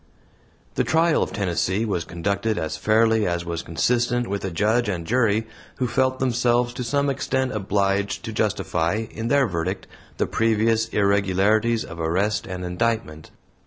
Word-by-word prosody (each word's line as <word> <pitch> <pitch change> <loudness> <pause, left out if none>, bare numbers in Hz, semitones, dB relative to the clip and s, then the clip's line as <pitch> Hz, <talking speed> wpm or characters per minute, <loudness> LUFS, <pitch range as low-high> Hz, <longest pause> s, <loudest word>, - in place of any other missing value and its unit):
The - - +1
trial 165 0 +2
of - - -1
Tennessee 95 +2 0
was 90 -6 -2
conducted 100 +5 -2
as 80 - -2
fairly 110 0 +2
as 85 -1 -2
was 85 -1 -3
consistent 120 +9 0
with 100 0 -3
a 95 - -2
judge 105 +6 +1
and 85 -4 -3
jury 110 0 +2 0.3
who 125 - -1
felt 130 +2 +1
themselves 120 -1 +1
to 125 0 -4
some 140 +4 0
extent 130 -1 -1
obliged 100 -1 -1
to - - -5
justify, 90 +7 0
in 115 +1 -4
their 140 +1 +3
verdict, 90 -1 -3 0.3
the - - +1
previous 115 0 +1
irregularities 100 +2 +2
of 85 - -9
arrest 95 +6 0
and 90 -1 -5
indictment. 90 -4 -2
110 Hz, 155 wpm, -23 LUFS, 95-120 Hz, 0.3 s, their